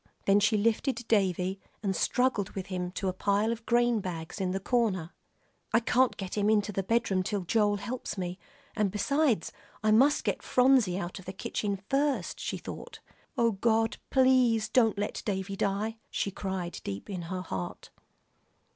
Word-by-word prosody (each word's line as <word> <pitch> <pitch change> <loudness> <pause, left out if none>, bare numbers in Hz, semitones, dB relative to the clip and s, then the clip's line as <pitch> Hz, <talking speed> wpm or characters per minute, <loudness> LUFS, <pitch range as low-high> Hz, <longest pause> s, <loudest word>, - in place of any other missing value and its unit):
Then 200 +1 +5
she 210 +1 +3
lifted 230 +2 0
Davie 190 -2 +1 0.2
and 195 -2 0
struggled 245 0 +1
with 190 -2 -4
him 180 -1 -2
to 190 - -2
a 185 - 0
pile 200 +4 +1
of 230 -1 -6
grain 240 -1 +3
bags 180 0 -5
in 185 - 0
the 190 +1 -1
corner. 195 -6 0 0.6
"I 230 - +6
can't 250 +2 +2
get 190 -2 -5
him 205 0 +2
into 210 -1 +2
the 195 - -1
bedroom 200 -2 +1
till 200 +2 -2
Joel 205 +3 +2
helps 240 +2 -5
me, 180 0 -4 0.4
and 210 -3 +2
besides, 240 - +1 0.3
I 215 - +3
must 270 +7 +5
get - - -1
Phronsie 250 -8 +3
out 180 0 -5
of 185 - -13
the 190 - -6
kitchen 200 +1 -2
first," 280 +1 0
she - - -3
thought. - - -8 0.4
"Oh, 235 -1 +3
God! 225 +2 +1
please 255 -5 +4
don't 225 -3 +3
let 205 +1 -2
Davie 195 -1 -2
die," 210 +3 -1
she 200 - -2
cried 190 -3 -4
deep 100 0 -5
in 190 -3 -4
her 185 0 -3
heart. 95 - -6
205 Hz, 175 wpm, -29 LUFS, 190-230 Hz, 0.6 s, I